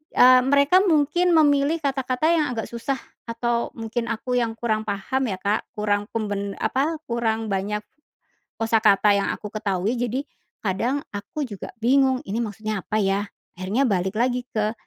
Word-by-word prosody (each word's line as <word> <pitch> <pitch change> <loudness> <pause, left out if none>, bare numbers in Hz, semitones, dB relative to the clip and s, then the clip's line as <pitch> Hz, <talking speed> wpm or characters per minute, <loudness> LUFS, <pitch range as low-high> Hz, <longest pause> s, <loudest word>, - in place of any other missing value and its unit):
eee, 255 0 +7
mereka 280 +6 +5
mungkin 345 +1 +3
memilih 295 +1 +3
kata-kata 265 0 0
yang 315 -3 +3
agak 225 - -2
susah 235 +3 -2 0.3
atau 235 0 -1
mungkin 230 +1 -3
aku 245 +3 -1
yang 225 -2 -1
kurang 220 -2 -1
paham 225 +7 -1
ya, 195 - -2
Kak, 205 +2 -1
kurang 205 -1 0
pembe 200 -2 -2
apa, 275 +8 +1
kurang 225 -2 -1
banyak 205 +2 -2 0.7
kosakata 215 -2 +4
yang 200 - 0
aku 210 - -9
ketahui. 205 +1 -1
Jadi 245 +3 -1 0.4
kadang 235 +9 -1
aku 205 +9 -4
juga 205 -7 -7
bingung 260 +2 +3
ini 215 +4 -3
maksudnya 215 -1 -3
apa 215 - -2
ya 200 0 0 0.3
akhirnya 200 +9 0
balik 190 -3 0
lagi 245 +1 +1
ke, 215 0 -1
230 Hz, 155 wpm, -23 LUFS, 210-265 Hz, 0.7 s, eee